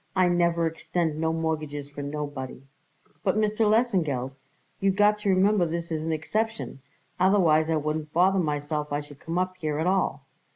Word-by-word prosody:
I 185 -1 +4
never 170 -1 +2
extend 165 -1 -2
no 160 0 +1
mortgages 155 -3 -3
for 145 - -7
nobody." 145 -3 -5 0.6
"But, 195 0 +1
Mr. 215 0 +2
Lesengeld, 175 - +1 0.5
you 195 - +2
got 210 +2 +3
to 210 -1 -1
remember 190 -1 +3
this 170 +1 -4
is 155 -1 -2
an - - 0
exception, 215 +1 -2 0.4
otherwise 175 -5 +4
I 160 - +2
wouldn't 155 0 -2
bother 185 +4 +3
myself 150 -2 -2
I 145 +1 0
should 145 -1 -14
come 165 +1 -4
up 185 0 -1
here 155 -4 -2
at 160 - 0
all. 190 +1 0
165 Hz, 170 wpm, -26 LUFS, 150-190 Hz, 0.6 s, I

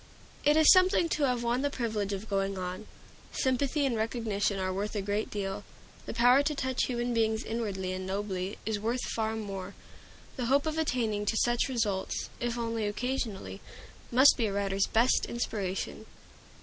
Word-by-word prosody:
It 295 +1 +4
is 315 -1 +8
something 370 -2 +5
to 300 -3 +1
have 245 -2 0
won 240 +2 +1
the 285 - +1
privilege 220 -6 -2
of 200 +2 -4
going 195 -1 -1
on. 185 +3 -5 0.5
Sympathy 270 +2 +1
and 255 -4 0
recognition 220 -3 -1
are 185 0 -1
worth 205 +3 -3
a 205 - 0
great 205 +2 -1
deal; 200 0 -4 0.4
the - - -4
power 245 +3 +6
to 295 +1 -1
touch 260 -2 0
human 240 -1 -2
beings 220 -1 +1
inwardly 200 -5 -3
and 185 0 -5
nobly 195 -1 -3
is 215 -1 -1
worth 235 +4 -1
far 220 0 -1
more. 200 -3 -6 0.6
The 250 - -1
hope 275 +4 +3
of 315 0 -1
attaining 225 -8 0
to 225 - +1
such 240 +3 +2
results, 215 -7 -1
if 240 0 -2
only 230 -2 -1
occasionally, 235 -2 -3 0.5
must 260 +4 +7
be 230 -4 +1
a - - -2
writer's 195 -1 0
best 235 +3 +3
inspiration. 200 -5 -3
225 Hz, 175 wpm, -30 LUFS, 200-250 Hz, 0.6 s, is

